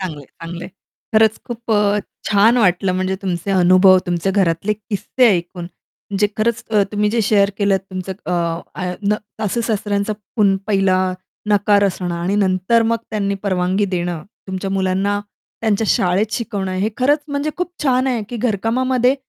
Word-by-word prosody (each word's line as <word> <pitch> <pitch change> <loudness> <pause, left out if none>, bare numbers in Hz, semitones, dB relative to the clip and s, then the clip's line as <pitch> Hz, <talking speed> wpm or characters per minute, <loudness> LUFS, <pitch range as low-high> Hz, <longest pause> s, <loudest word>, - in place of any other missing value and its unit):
चांगलं 175 -6 -4
आहे, 135 - -14
चांगलं 170 +1 -6
आहे. - - -9 0.4
खरंच 220 0 +4
खूप 235 -1 -7
अ, 205 -1 +3 0.3
छान 215 +4 +4
वाटलं 185 -3 +2
म्हणजे 185 +1 -1
तुमचे 180 0 -2
अनुभव, 185 0 +6
तुमचे 175 +1 0
घरातले 190 0 +1
किस्से 215 +4 0
ऐकून 175 0 -6
म्हणजे 200 +3 -4
खरंच 230 +1 0
अ, 210 -2 +4
तुम्ही 210 0 +1
जे 230 +1 +1
शेअर 200 -1 +3
केलंत 200 -2 +2
तुमचं 185 0 -4
अ, - - -1 0.4
आ 180 -1 -3
न 205 +1 +2 0.3
सासू-सासऱ्यांचा 210 -1 -1 0.2
पुन 200 -3 +4
पहिला 195 -3 +2 0.5
नकार 205 0 +4
असणं 180 -2 -1
आणि 175 +4 -1
नंतर 190 +3 +2
मग 230 +1 +1
त्यांनी 200 -2 -1
परवानगी 185 +1 +1
देणं, 175 -2 -2 0.3
तुमच्या 190 +1 -3
मुलांना 195 +1 0 0.4
त्यांच्या 220 -1 +1
शाळेत 190 +4 +1
शिकवणं. 200 -5 -3
हे 190 +3 0
खरंच 290 +4 +2
म्हणजे 285 +1 -1
खूप 360 0 -3
छान 260 -2 +2
आहे 245 -4 0
की 240 - -5
घरकामामध्ये 245 +3 +1
200 Hz, 160 wpm, -19 LUFS, 185-220 Hz, 0.5 s, अनुभव